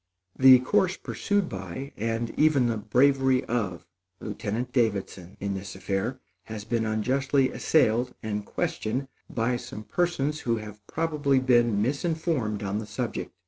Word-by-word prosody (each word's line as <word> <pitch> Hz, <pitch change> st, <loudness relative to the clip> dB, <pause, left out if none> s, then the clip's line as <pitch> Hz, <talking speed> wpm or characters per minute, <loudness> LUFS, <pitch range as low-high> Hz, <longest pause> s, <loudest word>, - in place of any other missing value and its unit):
The 130 Hz, -1 st, +9 dB
course 180 Hz, +8 st, +2 dB
pursued 205 Hz, -3 st, -1 dB
by, 95 Hz, +9 st, -6 dB
and 115 Hz, +1 st, -2 dB
even 150 Hz, -5 st, +4 dB
the 115 Hz, -2 st, 0 dB
bravery 130 Hz, +4 st, +3 dB
of, 105 Hz, -8 st, -2 dB, 0.3 s
Lieutenant 110 Hz, +4 st, -4 dB
Davidson 100 Hz, -6 st, -1 dB
in 100 Hz, 0 st, -2 dB
this 95 Hz, 0 st, -6 dB
affair, 100 Hz, +7 st, -2 dB, 0.3 s
has 110 Hz, -2 st, -7 dB
been 110 Hz, 0 st, 0 dB
unjustly 130 Hz, +5 st, +1 dB
assailed 125 Hz, -4 st, +2 dB
and 105 Hz, -1 st, -2 dB
questioned 125 Hz, +6 st, -2 dB, 0.2 s
by 120 Hz, +1 st, 0 dB
some 110 Hz, -2 st, -8 dB
persons 155 Hz, 0 st, 0 dB
who 115 Hz, -5 st, 0 dB
have 105 Hz, -1 st, -9 dB
probably 150 Hz, -4 st, +1 dB
been 120 Hz, -5 st, +3 dB
misinformed 140 Hz, -, -1 dB
on 100 Hz, +1 st, -1 dB
the 110 Hz, -, -6 dB
subject. -, -, -4 dB
120 Hz, 140 wpm, -27 LUFS, 105-135 Hz, 0.3 s, The